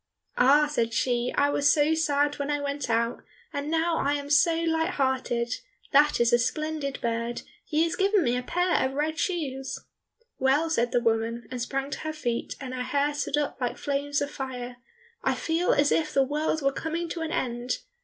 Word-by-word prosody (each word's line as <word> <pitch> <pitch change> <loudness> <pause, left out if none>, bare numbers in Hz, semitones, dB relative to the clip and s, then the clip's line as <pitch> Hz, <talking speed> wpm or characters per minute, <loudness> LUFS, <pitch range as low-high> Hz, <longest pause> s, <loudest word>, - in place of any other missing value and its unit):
"Ah," 280 +4 +6
said 235 -6 -1
she, 245 -1 +1
"I 285 0 +3
was 285 0 +4
so 300 +1 +3
sad 290 -2 +1
when 285 0 -2
I 290 0 0
went 285 -2 -3
out 230 +1 0 0.3
and 285 +1 -3
now 325 +1 +1
I 285 +1 +1
am 285 0 -3
so 310 +3 +5
light 325 +1 0
hearted; 255 -3 0 0.4
that 295 +1 +5
is 235 0 +3
a 240 - +6
splendid 305 +1 -2
bird, 235 0 -2 0.2
he 315 0 +1
has 330 - 0
given 395 -1 +3
me 245 -2 +1
a 250 - -1
pair 355 +7 +1
of 260 - -1
red 310 +3 -1
shoes!" 270 -7 -2 0.6
"Well," 285 +5 +2
said 240 -5 +1
the 245 - +2
woman, 230 0 0
and 250 -1 -4
sprang 275 +3 -2
to - - -4
her 310 0 -4
feet 240 -6 -3
and 260 -2 -6
her 255 - -3
hair 285 +3 0
stood 290 0 -1
up 290 -2 -2
like 245 - -1
flames 285 0 -1
of 285 - -5
fire, 250 -2 -6 0.5
"I - - +2
feel 330 +2 +1
as 285 0 +3
if 310 -2 +1
the 275 - +5
world 300 +2 -1
were 275 0 +2
coming 330 +3 -3
to 335 - -4
an 325 0 -3
end! 245 -3 -2
285 Hz, 205 wpm, -27 LUFS, 250-310 Hz, 0.6 s, Ah